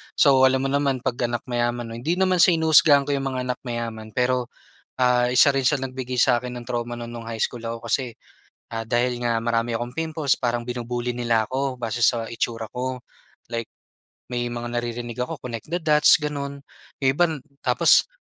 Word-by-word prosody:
So, 135 -2 +6
alam 130 0 +1
mo 135 - -1
naman 140 -3 0
'pag 130 -3 -2
anak 120 -1 -3
mayaman 120 -1 -2
'no, 115 - -6
hindi 160 +8 0
naman 185 -1 +2
sa - - +8
hinuhusgahan 155 -3 +5
ko 145 - -3
yung 135 -1 -1
mga 130 -1 -2
anak - - -6
mayaman 115 -2 -5
pero, 125 0 +1 0.5
ah, 125 -1 +3
isa 135 +2 +5
rin 135 - +1
sila 135 0 +1
nagbigay 130 -1 -4
sa 125 +1 +5
akin 125 0 -5
ng 120 - -12
trauma 120 0 -3
no'n 120 - -6
no'ng 115 -1 -8
high 115 - -6
school 120 +1 -2
ako 115 0 -5
kasi, 125 0 0 0.6
ah, 115 - -2
dahil 120 +2 0
nga 115 -1 +1
marami 115 0 0
akong 120 +2 -4
pimples 160 -4 0
parang 120 -1 -2
binubully 120 0 -3
nila 115 -3 +1
ako 130 -1 -2
base 120 0 -2
sa 115 -2 +2
itsura 115 -1 -3
ko. 130 +1 -3 0.5
Like, 115 -1 -5 0.6
may 120 0 -1
mga 120 0 -5
naririnig 120 0 -4
ako, 125 - -2
connect 115 -3 -6
the 170 +1 -3
dots, 150 -1 +6
gano'n. 140 -1 -4 0.4
Yung 130 - +4
iba 175 +6 +3 0.3
tapos, - - +4
125 Hz, 195 wpm, -23 LUFS, 120-135 Hz, 0.6 s, sa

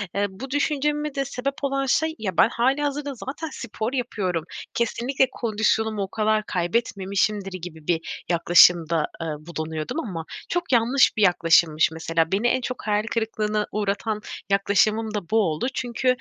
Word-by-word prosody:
eee, 200 0 +1
bu 250 +8 -9
düşünceme 295 +1 0
de 275 0 0
sebep 275 +1 -3
olan 275 0 0
şey, 315 +4 +1
ya, 190 -5 -3
ben - - +6
hâlihazırda 285 +3 0
zaten 285 +6 -6
spor 230 0 -4
yapıyorum, 195 - -2 0.3
kesinlikle 245 +3 +1
kondisyonumu 220 -1 0
o - - -3
kadar 215 0 +1
kaybetmemişimdir 195 +1 -1
gibi 160 -3 -9
bir 165 -1 -2
yaklaşımda, 170 -1 +5 0.2
ııı, 155 -2 -3
bulunuyordum 160 - -4
ama 175 - -5 0.2
çok 350 -5 -2
yanlış 245 +3 +4
bir - - +1
yaklaşımmış. 165 -3 +4
Mesela 165 +1 -1
beni 210 +5 +2
en 255 +1 +1
çok 250 -3 -5
hayal 210 0 +2
kırıklığına 215 -2 -1
uğratan 210 +1 -1 0.3
yaklaşımım 210 +2 +2
da 200 -6 -4
bu 225 - +2
oldu. 160 +4 0
Çünkü, 250 +1 -3
215 Hz, 150 wpm, -24 LUFS, 180-255 Hz, 0.3 s, ben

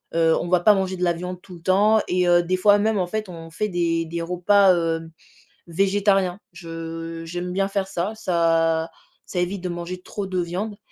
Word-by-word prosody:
heu, 165 -1 +4
on - - -4
va 180 0 +3
pas 210 +4 +6
manger 190 -1 -1
de 180 - -3
la 175 - +3
viande 180 +1 -6
tout 180 - -12
le 170 - -14
temps 205 +5 +4
et 180 0 +1
heu, 175 0 +5
des 180 +2 0
fois 205 +2 +5
même 210 0 +1
en 180 - 0
fait 215 +3 -3
on 165 -2 -9
fait 210 +6 -2
des 170 -2 0
des 170 +1 -4
repas, 185 +3 +4
heu, 165 -1 -2 0.6
végétariens. 195 +1 +1
Je 165 0 -7
j'aime 175 +2 -5
bien 195 +1 0
faire 195 -1 -1
ça, 195 +3 -3
ça 165 -4 +1 0.4
ça 180 - -5
évite 180 +2 -2
de 180 - -3
manger 175 +1 -6
trop 200 +1 -5
de 185 -1 -1
viande 185 +5 -4
180 Hz, 210 wpm, -23 LUFS, 170-195 Hz, 0.6 s, pas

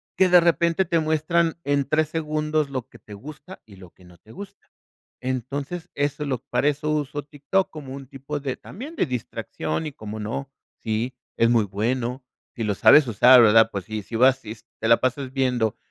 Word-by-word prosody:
que 190 -1 +4
de 180 0 +8
repente 170 +1 +2
te 165 -1 +1
muestran 160 +2 +1
en 140 -1 +1
3 155 -1 +1
segundos 155 -1 -1
lo 130 -3 -5
que 115 - -17
te 105 - -13
gusta, 150 - -11
y 100 -3 -16
lo 95 -2 -13
que 90 - -21
no 90 -1 -17
te 110 - -19
gusta. 200 - -12 0.5
Entonces, 140 +7 -4
eso 145 +1 -1
lo 135 -3 -2
para 145 - +1
eso 150 +1 -1
uso 145 -1 -2
TikTok 145 +6 -1
como 145 -4 -9
un 135 -1 -9
tipo 140 +3 -6
de 135 -2 -3
también 285 - -10
de - - +2
distracción 125 - -4
y 150 - -5
cómo 110 -3 -8
no, 120 +6 -5 0.3
sí, 115 +3 -2 0.2
es 115 0 +4
muy 115 -3 +3
bueno, 120 +6 -2 0.3
si 115 - -4
lo 105 -1 0
sabes 150 +7 +6
usar, 125 +2 +7
¿verdad? 110 0 +6
Pues, 100 -4 -5
si 110 +2 -5
si 115 - -6
vas 130 +2 +4
y 110 +2 -6 0.2
te 115 - -1
la 115 - +6
pasas 130 +1 -2
viendo 125 -5 0
135 Hz, 200 wpm, -23 LUFS, 115-155 Hz, 0.5 s, de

